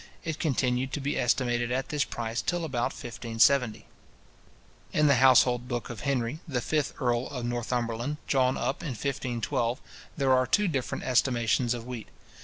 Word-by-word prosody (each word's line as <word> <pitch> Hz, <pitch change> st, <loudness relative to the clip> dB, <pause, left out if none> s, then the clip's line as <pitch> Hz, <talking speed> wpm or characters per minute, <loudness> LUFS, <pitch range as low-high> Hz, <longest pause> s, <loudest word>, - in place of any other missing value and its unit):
It 160 Hz, -2 st, -4 dB
continued 130 Hz, -3 st, 0 dB
to -, -, -1 dB
be 140 Hz, +1 st, -2 dB
estimated 120 Hz, -1 st, +1 dB
at 130 Hz, +1 st, -1 dB
this 150 Hz, -1 st, +1 dB
price 115 Hz, -1 st, -3 dB
till 175 Hz, -1 st, -1 dB
about 125 Hz, -6 st, -1 dB
1570. 120 Hz, 0 st, +1 dB, 1.1 s
In 150 Hz, -, +3 dB
the 140 Hz, -3 st, +5 dB
household 125 Hz, -1 st, +5 dB
book 120 Hz, -1 st, -3 dB
of 120 Hz, -, -7 dB
Henry, 135 Hz, 0 st, -1 dB
the 135 Hz, -5 st, -1 dB
fifth 150 Hz, +3 st, -1 dB
earl 120 Hz, -2 st, 0 dB
of 125 Hz, -3 st, -5 dB
Northumberland, 120 Hz, +2 st, -2 dB
drawn 130 Hz, -2 st, +2 dB
up 135 Hz, -, -2 dB
in 155 Hz, -6 st, -4 dB
1512 120 Hz, -1 st, -2 dB, 0.4 s
there 135 Hz, -3 st, +3 dB
are 130 Hz, 0 st, +3 dB
two 210 Hz, -1 st, +3 dB
different 135 Hz, -7 st, -2 dB
estimations 120 Hz, -1 st, +2 dB
of 115 Hz, -1 st, -7 dB
wheat. 120 Hz, -3 st, -6 dB
125 Hz, 160 wpm, -28 LUFS, 120-140 Hz, 1.1 s, the